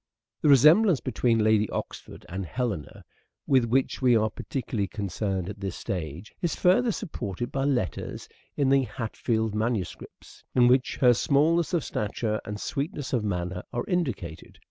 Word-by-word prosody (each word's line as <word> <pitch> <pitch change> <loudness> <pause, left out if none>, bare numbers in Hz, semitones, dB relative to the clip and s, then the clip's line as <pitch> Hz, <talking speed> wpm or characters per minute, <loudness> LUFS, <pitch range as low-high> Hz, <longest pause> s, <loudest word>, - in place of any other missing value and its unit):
The 150 - +3
resemblance 155 - +6
between 115 -2 +1
Lady 110 -1 +3
Oxford - - -6
and 95 +2 -4
Helena 105 -1 -2
Helena, - - -15 0.4
with 130 -3 +3
which 130 +4 0
we 125 -2 +5
are 110 -1 +2
particularly 115 -7 -3
concerned 95 -1 -3
at 100 0 -7
this 95 -2 -4
stage 85 +1 -5
is 175 - 0
further 210 +7 +3
supported 120 - -5
by 135 0 -1
letters 125 -10 -2 0.3
in 140 -2 +2
the 135 0 +5
Hatfield 110 -3 -2
manu 110 -1 0
scripts, - - -13
in 125 -1 +6
which 125 0 +2
her 125 -2 +7
smallness 155 +7 +2
of 165 - 0
stature 105 +1 -2
and 105 0 -5
sweetness 140 +1 -4
of 120 -4 +1
manner 90 -2 -2
are 120 0 -2
indicated. 120 - -3
120 Hz, 160 wpm, -27 LUFS, 100-135 Hz, 0.4 s, her